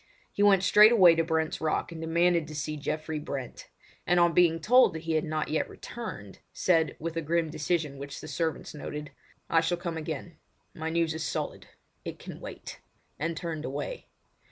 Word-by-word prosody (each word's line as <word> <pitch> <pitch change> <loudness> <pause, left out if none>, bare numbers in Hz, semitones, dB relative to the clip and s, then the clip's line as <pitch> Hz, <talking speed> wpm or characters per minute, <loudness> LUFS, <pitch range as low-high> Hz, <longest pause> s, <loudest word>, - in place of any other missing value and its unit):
He - - -2
went 200 -2 +5
straightway 210 -3 +7
to 165 0 +1
Brent's 160 -1 -1
Rock, 160 +1 -1
and 165 -1 -7
demanded 170 0 +2
to 155 - -8
see 155 +1 -3
Geoffrey 155 +1 -3
Brent, 135 -4 -6 0.4
and 175 +1 +4
on 170 -1 +4
being 165 -1 +4
told 250 +7 +5
that 160 - -6
he 165 - -3
had 155 - +2
not 155 -1 -2
yet 155 - 0
returned, 215 - -8
said, 165 -3 +2
with 165 +1 -5
a - - 0
grim 165 0 0
decision 155 -2 -1
which 140 0 -7
the - - -9
servants 165 -2 -3
noted: 150 0 -6 0.4
"I 165 - +3
shall 170 +2 0
come 170 -2 -4
again. 160 +1 -6 0.4
My 160 0 -4
news 165 -1 +1
is 160 0 -4
solid—it - - -6
can - - -9
wait!" - - -9 0.4
and 165 +2 -2
turned 160 -2 -4
away. 145 - -5
160 Hz, 180 wpm, -28 LUFS, 155-170 Hz, 0.4 s, straightway